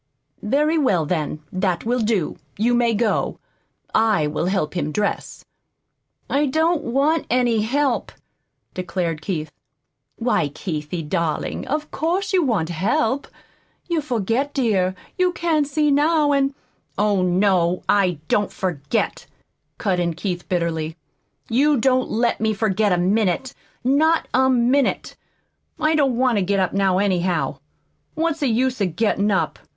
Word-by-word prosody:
"Very 300 Hz, +8 st, +1 dB
well, 190 Hz, -, +2 dB
then, 155 Hz, -2 st, -2 dB
that 185 Hz, -1 st, -1 dB
will 245 Hz, +2 st, +1 dB
do. 215 Hz, -7 st, 0 dB, 0.2 s
You 230 Hz, +4 st, +2 dB
may 240 Hz, -2 st, +2 dB
go. 215 Hz, 0 st, 0 dB, 0.6 s
I 215 Hz, -8 st, +3 dB
will 150 Hz, +3 st, -1 dB
help 190 Hz, -5 st, -1 dB
him 155 Hz, -4 st, -1 dB
dress." 205 Hz, +6 st, -3 dB, 0.8 s
"I 290 Hz, +2 st, +1 dB
don't 320 Hz, +4 st, +1 dB
want 280 Hz, +6 st, +1 dB
any 240 Hz, -2 st, +2 dB
help," 265 Hz, +3 st, 0 dB, 0.6 s
declared 175 Hz, -3 st, -3 dB
Keith. 155 Hz, -3 st, -3 dB, 0.6 s
"Why, 230 Hz, -9 st, +1 dB
Keithie, 155 Hz, +1 st, -4 dB
darling, 170 Hz, -2 st, -2 dB
of 300 Hz, +2 st, -3 dB
course 350 Hz, +7 st, -1 dB
you 370 Hz, -, +4 dB
want 205 Hz, -, 0 dB
help! 220 Hz, -, 0 dB, 0.6 s
You 340 Hz, -3 st, 0 dB
forget, 250 Hz, +1 st, -1 dB
dear, 195 Hz, -8 st, +1 dB, 0.2 s
you 365 Hz, 0 st, +3 dB
can't 320 Hz, -4 st, +1 dB
see 300 Hz, 0 st, +1 dB
now, 300 Hz, +1 st, +3 dB
and 275 Hz, -1 st, +1 dB, 0.2 s
" -, -, -46 dB
"Oh, 205 Hz, -1 st, +2 dB
no, 180 Hz, -1 st, +2 dB
I 185 Hz, -5 st, +2 dB
don't 205 Hz, +5 st, +1 dB
forget," 155 Hz, -7 st, -2 dB, 0.5 s
cut 190 Hz, -4 st, 0 dB
in 170 Hz, -2 st, -1 dB
Keith 175 Hz, 0 st, -4 dB
bitterly. 165 Hz, -3 st, -1 dB, 0.5 s
"You 280 Hz, +5 st, +3 dB
don't 255 Hz, +2 st, +2 dB
let 235 Hz, +1 st, 0 dB
me 220 Hz, -1 st, +1 dB
forget 210 Hz, -1 st, +1 dB
a 180 Hz, -, +3 dB
minute 200 Hz, +6 st, +1 dB, 0.3 s
not 310 Hz, +6 st, +3 dB
a 260 Hz, +1 st, +4 dB
minute. 255 Hz, +2 st, +1 dB, 0.6 s
I 310 Hz, +1 st, +2 dB
don't 275 Hz, -6 st, +2 dB
want 250 Hz, -4 st, +2 dB
to -, -, +1 dB
get 195 Hz, +1 st, +1 dB
up 185 Hz, -, 0 dB
now, 195 Hz, -2 st, +2 dB
anyhow. 175 Hz, -8 st, 0 dB, 0.6 s
What's 325 Hz, 0 st, 0 dB
the 285 Hz, -, +1 dB
use 250 Hz, +1 st, 0 dB
of 180 Hz, -5 st, -1 dB
gettin' 210 Hz, 0 st, +1 dB
up? 195 Hz, -2 st, 0 dB
220 Hz, 145 wpm, -21 LUFS, 180-275 Hz, 0.8 s, you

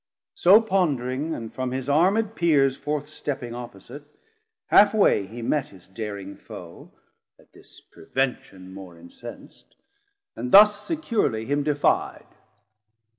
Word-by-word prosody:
So 395 Hz, -, +6 dB
pondering, 155 Hz, -, -1 dB
and 115 Hz, -1 st, -8 dB
from 130 Hz, -1 st, -3 dB
his 130 Hz, +1 st, -5 dB
armed 195 Hz, +9 st, +2 dB
Peers 140 Hz, -6 st, +2 dB
Forth 145 Hz, +1 st, -4 dB
stepping 135 Hz, -5 st, -6 dB
opposite, 120 Hz, +3 st, -10 dB, 0.6 s
half 205 Hz, +2 st, +5 dB
way 105 Hz, -, +3 dB
he 115 Hz, +3 st, -9 dB
met 145 Hz, +3 st, -1 dB
His 95 Hz, -3 st, -18 dB
daring 100 Hz, -1 st, -7 dB
foe, -, -, -12 dB, 0.5 s
at -, -, -25 dB
this -, -, -17 dB
prevention 95 Hz, -5 st, -5 dB
more 95 Hz, -3 st, -11 dB
Incens't, 85 Hz, +8 st, -13 dB, 0.6 s
and 125 Hz, -, -5 dB
thus 210 Hz, 0 st, +7 dB
securely 225 Hz, -, -1 dB
him 145 Hz, +3 st, 0 dB
defi'd. 145 Hz, 0 st, 0 dB
135 Hz, 125 wpm, -24 LUFS, 115-170 Hz, 0.6 s, thus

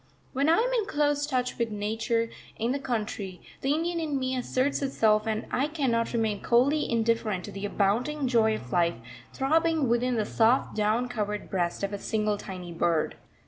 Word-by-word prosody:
When 280 Hz, +3 st, +2 dB
I 330 Hz, -, +5 dB
am -, -, +1 dB
in 445 Hz, -4 st, +1 dB
close 290 Hz, -4 st, +1 dB
touch 250 Hz, -4 st, -1 dB
with 235 Hz, -1 st, +1 dB
Nature 225 Hz, +2 st, -1 dB, 0.3 s
in 230 Hz, +2 st, 0 dB
the 280 Hz, -, -1 dB
country, 210 Hz, -7 st, -3 dB, 0.2 s
the 270 Hz, -, +1 dB
Indian 335 Hz, +2 st, -1 dB
in 305 Hz, -4 st, -1 dB
me 260 Hz, 0 st, -1 dB
asserts 255 Hz, +3 st, 0 dB
itself 220 Hz, -6 st, +2 dB
and 220 Hz, -1 st, -1 dB
I 275 Hz, +3 st, +1 dB
cannot 260 Hz, -7 st, 0 dB
remain 220 Hz, -3 st, 0 dB
coldly 275 Hz, +6 st, +3 dB
indifferent 225 Hz, -5 st, 0 dB
to -, -, -8 dB
the 195 Hz, +1 st, -4 dB
abounding 245 Hz, +9 st, 0 dB
joy 225 Hz, -3 st, +3 dB
of 125 Hz, -10 st, -9 dB
life 170 Hz, +2 st, +2 dB, 0.4 s
throbbing 320 Hz, +1 st, +2 dB
within 240 Hz, +1 st, +1 dB
the 215 Hz, -2 st, 0 dB
soft 230 Hz, +5 st, +2 dB
down 215 Hz, +3 st, +1 dB
covered 210 Hz, -4 st, -3 dB
breast 175 Hz, 0 st, -1 dB
of 200 Hz, +1 st, -1 dB
a 200 Hz, -, -3 dB
single 215 Hz, -1 st, -1 dB
tiny 180 Hz, -3 st, -7 dB
bird. 165 Hz, -1 st, +1 dB
230 Hz, 185 wpm, -28 LUFS, 210-275 Hz, 0.4 s, I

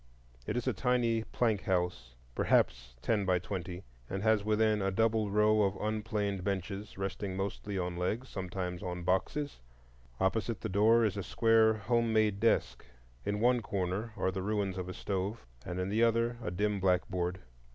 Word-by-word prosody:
It -, -, -1 dB
is 125 Hz, -, -2 dB
a -, -, +2 dB
tiny 120 Hz, -3 st, +1 dB
plank 110 Hz, -5 st, 0 dB
house, 90 Hz, -10 st, -1 dB, 0.2 s
perhaps 60 Hz, +1 st, +1 dB
ten 110 Hz, -3 st, +1 dB
by 90 Hz, -1 st, +2 dB
twenty, 90 Hz, 0 st, -5 dB, 0.3 s
and 95 Hz, +1 st, -3 dB
has 110 Hz, -2 st, +3 dB
within 110 Hz, 0 st, +2 dB
a 95 Hz, -, +1 dB
double 110 Hz, +1 st, +1 dB
row 105 Hz, +1 st, +4 dB
of 100 Hz, -1 st, +2 dB
rough -, -, -7 dB
unplaned 105 Hz, -3 st, -1 dB
benches, 100 Hz, +1 st, -3 dB
resting 95 Hz, 0 st, -3 dB
mostly 100 Hz, +1 st, -3 dB
on 90 Hz, -1 st, -2 dB
legs, 105 Hz, +9 st, -2 dB
sometimes 90 Hz, -2 st, -4 dB
on 90 Hz, -2 st, -4 dB
boxes. 115 Hz, +11 st, -1 dB, 0.6 s
Opposite 110 Hz, +4 st, 0 dB
the 110 Hz, -, -3 dB
door 110 Hz, +4 st, +4 dB
is 105 Hz, -1 st, -1 dB
a -, -, -1 dB
square 110 Hz, 0 st, +4 dB
home 115 Hz, +2 st, +1 dB
made 105 Hz, -2 st, +2 dB
desk. 115 Hz, +2 st, +1 dB, 0.4 s
In 105 Hz, 0 st, 0 dB
one 120 Hz, +1 st, +3 dB
corner 100 Hz, +2 st, -2 dB
are 95 Hz, -, +1 dB
the 95 Hz, 0 st, -3 dB
ruins 100 Hz, -2 st, -1 dB
of 90 Hz, 0 st, -4 dB
a -, -, -4 dB
stove, 100 Hz, +3 st, -3 dB, 0.2 s
and 90 Hz, 0 st, -4 dB
in 90 Hz, -, -1 dB
the 110 Hz, +3 st, +1 dB
other 115 Hz, +1 st, +2 dB
a 105 Hz, -, -3 dB
dim 105 Hz, +3 st, 0 dB
blackboard. 90 Hz, -1 st, 0 dB
100 Hz, 175 wpm, -32 LUFS, 95-110 Hz, 0.6 s, row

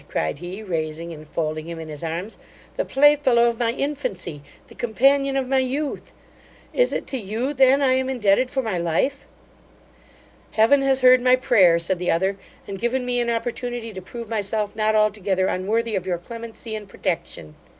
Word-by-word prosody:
(cried 80 Hz, -, -2 dB
he, 180 Hz, +5 st, -7 dB
raising 165 Hz, -2 st, -4 dB
and 155 Hz, -1 st, -11 dB
folding 155 Hz, 0 st, -3 dB
him 170 Hz, 0 st, -6 dB
in 160 Hz, -1 st, -7 dB
his 150 Hz, 0 st, -8 dB
arms) 170 Hz, +6 st, -5 dB, 0.4 s
the -, -, 0 dB
playfellow 270 Hz, -, +4 dB
of 235 Hz, -1 st, -1 dB
my 235 Hz, -1 st, +1 dB
infancy 200 Hz, -, -4 dB, 0.3 s
the -, -, -15 dB
companion 275 Hz, +4 st, +2 dB
of 265 Hz, -1 st, -1 dB
my 265 Hz, 0 st, +2 dB
youth! 270 Hz, +3 st, -3 dB, 0.6 s
Is -, -, +2 dB
it -, -, -3 dB
to 265 Hz, -, -4 dB
you 225 Hz, +7 st, -3 dB
then 270 Hz, +1 st, +4 dB
I 260 Hz, -1 st, +4 dB
am 260 Hz, 0 st, 0 dB
indebted 245 Hz, 0 st, +2 dB
for 265 Hz, -1 st, -1 dB
my 205 Hz, -6 st, -2 dB
life?' 170 Hz, -, -1 dB, 1.3 s
'Heaven 230 Hz, +6 st, +4 dB
has 270 Hz, -1 st, +2 dB
heard 255 Hz, 0 st, +7 dB
my 255 Hz, 0 st, +5 dB
prayer 200 Hz, -9 st, +4 dB
(said 170 Hz, +2 st, -2 dB
the 180 Hz, -, -2 dB
other), 190 Hz, +4 st, +1 dB, 0.3 s
and 195 Hz, -1 st, -6 dB
given 250 Hz, +2 st, 0 dB
me 245 Hz, 0 st, 0 dB
an 240 Hz, -1 st, 0 dB
opportunity 235 Hz, 0 st, -3 dB
to 190 Hz, -, -7 dB
prove 230 Hz, +5 st, -8 dB
myself 210 Hz, -1 st, -2 dB
not 215 Hz, 0 st, +1 dB
altogether 205 Hz, -3 st, +1 dB
unworthy 215 Hz, +5 st, -1 dB
of 190 Hz, -1 st, -3 dB
your 180 Hz, -2 st, 0 dB
clemency 230 Hz, +4 st, -8 dB
and 210 Hz, -2 st, -6 dB
protection. 165 Hz, -, -4 dB
225 Hz, 180 wpm, -23 LUFS, 185-255 Hz, 1.3 s, heard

